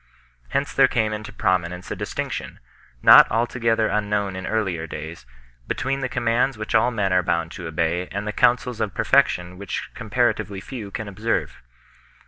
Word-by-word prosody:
Hence -, -, -1 dB
there -, -, +5 dB
came 110 Hz, -1 st, 0 dB
into 105 Hz, 0 st, -6 dB
prominence 90 Hz, -3 st, -1 dB
a -, -, -2 dB
distinction, -, -, -5 dB, 0.4 s
not -, -, +9 dB
altogether 115 Hz, -1 st, +1 dB
un 105 Hz, -1 st, -1 dB
known 100 Hz, -2 st, -1 dB
in 95 Hz, 0 st, -5 dB
earlier 95 Hz, -7 st, -1 dB
days, 80 Hz, -4 st, -8 dB, 0.4 s
between 135 Hz, +1 st, -1 dB
the 130 Hz, -1 st, -2 dB
commands 120 Hz, +2 st, +1 dB
which 110 Hz, -, -5 dB
all 120 Hz, -, +4 dB
men 100 Hz, -6 st, 0 dB
are 90 Hz, -, +4 dB
bound 85 Hz, -2 st, -1 dB
to 85 Hz, -4 st, -7 dB
obey 85 Hz, +3 st, -1 dB
and 100 Hz, +2 st, -5 dB
the 105 Hz, -, -2 dB
counsels 120 Hz, +1 st, +2 dB
of 105 Hz, -, -2 dB
perfection 90 Hz, +1 st, +2 dB
which 100 Hz, -2 st, -5 dB
comparatively 100 Hz, -2 st, -1 dB
few 110 Hz, 0 st, -7 dB
can 110 Hz, +1 st, -5 dB
observe. 105 Hz, +4 st, -2 dB
100 Hz, 165 wpm, -23 LUFS, 90-115 Hz, 0.4 s, not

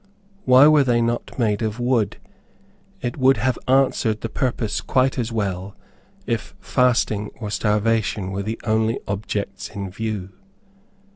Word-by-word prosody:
Why 130 Hz, +2 st, +7 dB
were 150 Hz, -2 st, +6 dB
they 120 Hz, -3 st, +2 dB
not 120 Hz, 0 st, -2 dB
made 110 Hz, -3 st, +1 dB
of 110 Hz, +1 st, -2 dB
wood? 120 Hz, -4 st, +1 dB, 0.8 s
It 120 Hz, -, -3 dB
would 130 Hz, 0 st, +4 dB
have 130 Hz, 0 st, 0 dB
answered 130 Hz, -4 st, +2 dB
the 115 Hz, -, -3 dB
purpose 110 Hz, -5 st, -1 dB
quite 130 Hz, +5 st, +1 dB
as 120 Hz, -1 st, -2 dB
well, 100 Hz, -3 st, -3 dB, 0.5 s
if -, -, -3 dB
fasting 115 Hz, -4 st, +1 dB
or 105 Hz, -3 st, -5 dB
starvation 105 Hz, -2 st, 0 dB
were 95 Hz, +1 st, -3 dB
the 110 Hz, +3 st, -4 dB
only 110 Hz, 0 st, +1 dB
objects 100 Hz, 0 st, -4 dB
in 100 Hz, -2 st, -6 dB
view. 105 Hz, -2 st, -4 dB
110 Hz, 140 wpm, -22 LUFS, 105-125 Hz, 0.8 s, Why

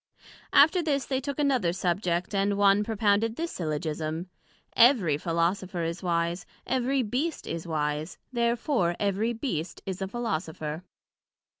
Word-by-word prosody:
After 320 Hz, +5 st, +6 dB
this 285 Hz, -4 st, 0 dB
they 265 Hz, -1 st, -1 dB
took 280 Hz, 0 st, -4 dB
another 265 Hz, -, +2 dB
subject, 180 Hz, 0 st, -1 dB
and 200 Hz, 0 st, +1 dB
one 200 Hz, 0 st, +5 dB
propounded 220 Hz, +1 st, +1 dB
this 335 Hz, +4 st, -3 dB
Syllogism: 155 Hz, +1 st, -3 dB, 0.4 s
Every 230 Hz, -, +5 dB
Philosopher 170 Hz, +3 st, -1 dB
is 165 Hz, +2 st, -3 dB
wise: 170 Hz, 0 st, 0 dB, 0.2 s
Every 260 Hz, +1 st, +1 dB
Beast 270 Hz, +9 st, -2 dB
is 165 Hz, +1 st, -5 dB
wise, 150 Hz, +1 st, -2 dB, 0.2 s
Therefore 235 Hz, -, +1 dB
every 205 Hz, +3 st, +1 dB
Beast 220 Hz, -, -4 dB
is 190 Hz, 0 st, -4 dB
a 190 Hz, -, -1 dB
Philosopher. 160 Hz, -7 st, -3 dB
195 Hz, 130 wpm, -27 LUFS, 170-240 Hz, 0.4 s, After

